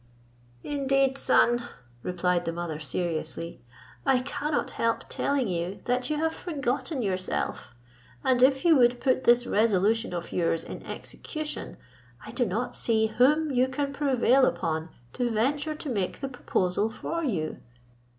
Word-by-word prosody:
"Indeed, 275 -1 +1
son," 240 -3 +4 0.4
replied 180 +1 0
the 165 - -1
mother 165 -2 -4
seriously, 165 +2 -3 0.4
"I 265 -2 +3
cannot 290 +3 -2
help 230 0 0
telling 280 -4 0
you 180 +1 -3
that 250 +2 0
you 305 - 0
have 320 +1 0
forgotten 280 -3 -2
yourself; 185 - -2 0.5
and 255 -1 +2
if 265 +3 +4
you 335 -2 +7
would 245 -1 +4
put 260 -1 +1
this 240 +1 +5
resolution 220 +1 +2
of 175 -1 -5
yours 165 -2 0
in - - -8
execution, 310 -1 -6 0.5
I - - -8
do 245 -3 0
not 220 +7 -2
see 220 -1 +2
whom 300 +4 +4
you 255 0 +3
can 280 +1 -2
prevail 265 -2 +3
upon 160 0 -2 0.2
to 245 -1 0
venture 285 +8 0
to 300 - -6
make 195 -6 -2
the 275 - -4
proposal 205 -5 0
for 335 +8 -4
you." 175 - -2
245 Hz, 145 wpm, -27 LUFS, 185-275 Hz, 0.5 s, you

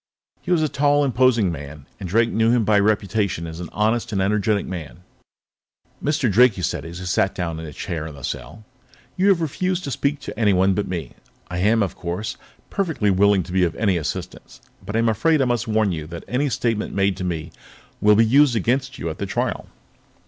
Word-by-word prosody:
He - - -9
was 165 -3 +3
a - - +2
tall, 145 0 +2
imposing 125 -6 +3
man, 70 -2 -8
and 95 -3 -6
Drake 115 +5 +2
knew 110 +1 +2
him 120 -2 +3
by 105 0 +4
reputation 100 -3 0
as 80 0 -7
an 90 - -6
honest, 110 +4 0
energetic 100 +1 +1
man. 85 -3 -7 1.0
"Mr. 150 -3 +1
Drake," 120 +3 +5
he 90 - -5
said - - -2
as 85 +1 -8
he 90 - -7
sat 90 +2 +1
down 85 -3 -3
in 80 - -7
a - - -7
chair 80 +2 -5
in 75 - -9
the 70 - -12
cell, 110 - -6 0.5
"you 190 +2 +2
have 185 -4 +3
refused 180 +4 -1
to 140 - -4
speak 140 +2 -1
to 120 - -7
anyone 95 -3 +3
but 105 +1 -1
me. 90 -3 -4 0.4
I 90 - -2
am, 110 +3 +3
of 95 - -4
course, 90 +5 -4 0.4
perfectly 160 - 0
willing 100 0 +3
to 85 - -10
be 95 0 +2
of 85 - 0
any 100 -4 +1
assistance, 80 -3 -5 0.2
but 100 +3 -6
I - - +3
am 115 0 +2
afraid 155 +9 +2
I 135 - +3
must 120 -3 -1
warn 110 -2 +2
you 80 -3 -4
that 85 0 -8
any 140 +3 0
statement 115 -4 -1
made 100 -1 +2
to 90 - -4
me 85 -2 -3 0.5
will 105 0 +6
be 115 +2 +5
used 135 +2 +4
against 130 +5 0
you - - -4
at 80 - -10
the - - -3
trial." - - -2
105 Hz, 215 wpm, -22 LUFS, 90-125 Hz, 1.0 s, will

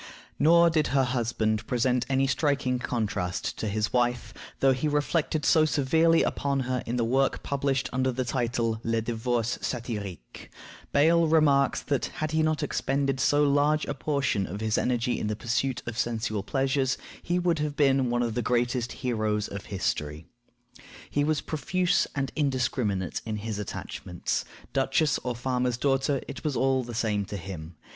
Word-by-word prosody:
Nor 170 +2 +6
did 155 -2 +2
her 135 - +5
husband 115 -3 -1
present 125 0 +1
any 135 0 +2
striking 130 -1 +1
contrast 105 -7 -2
to 110 - -2
his 105 +1 -1
wife, 120 -1 0 0.3
though 135 - +5
he 130 +4 0
reflected 150 +1 0
so 160 - +5
severely 160 +3 +3
upon 140 -1 0
her 125 -1 -1
in 120 - -1
the 120 - +1
work 135 +3 +1
published 135 -1 0
under 130 0 +1
the 130 +1 -2
title 120 -3 -1
Le 115 0 +1
divorce 120 0 -1
Satirique. 105 - -5 0.4
Bayle 165 +3 +4
remarks 150 -3 +3
that, 140 -3 0
had 155 0 -2
he 160 0 +2
not 155 -1 +1
expended 135 -1 0
so 145 +3 +3
large 145 +2 +3
a - - -3
portion 140 -10 -1
of 100 +4 -6
his 110 0 0
energy 125 0 0
in - - -2
the 105 - -1
pursuit 125 +3 -1
of 120 0 -5
sensual 110 -3 -1
pleasures, 135 +3 0 0.2
he 175 - -1
would 175 -3 +1
have 150 -1 -2
been 135 -3 +3
one 120 0 +1
of 115 -2 -1
the 120 - -1
greatest 120 +1 0
heroes 110 -3 0
of 100 0 -7
history. 80 -5 -3 0.9
He 145 - +1
was 155 0 +1
profuse 180 +3 0
and 135 -1 -1
indiscriminate 125 - -1
in 110 -1 -3
his 105 0 -4
attachments; 90 -3 -4 0.3
duchess 140 +2 +2
or 125 -1 -3
farmer's 125 0 -1
daughter, 135 +1 +1
it - - -7
was 150 -4 -1
all 130 -1 +2
the 120 -1 -7
same 105 -2 0
to 100 - -5
him. 85 -3 -8
125 Hz, 165 wpm, -27 LUFS, 115-140 Hz, 0.9 s, Nor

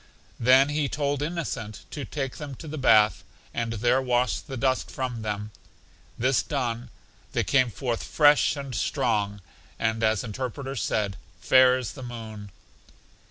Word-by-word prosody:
Then 130 +4 +6
he 150 -1 0
told 145 -1 -1
Innocent 145 - -4
to 145 -3 -5
take 135 -3 -4
them 145 -3 -6
to 160 - -10
the 155 0 -5
bath, 110 -6 +5 0.3
and 115 -1 -2
there 120 +4 +2
wash 125 -1 +1
the 135 -3 -7
dust 130 +1 0
from 125 -3 -4
them. 105 0 -4 0.7
This 125 +1 +2
done, 120 -4 -3 0.4
they - - +1
came 130 -3 +3
forth 120 0 -3
fresh 145 -1 +4
and 140 -2 -6
strong, 105 -3 0 0.4
and 110 0 0
as 110 -2 +2
Interpreter 130 +4 -5
said, 100 -3 -1 0.2
Fair 130 -1 +6
as 125 -6 -4
the - - -10
moon. 110 -4 -8
125 Hz, 150 wpm, -26 LUFS, 110-135 Hz, 0.7 s, Then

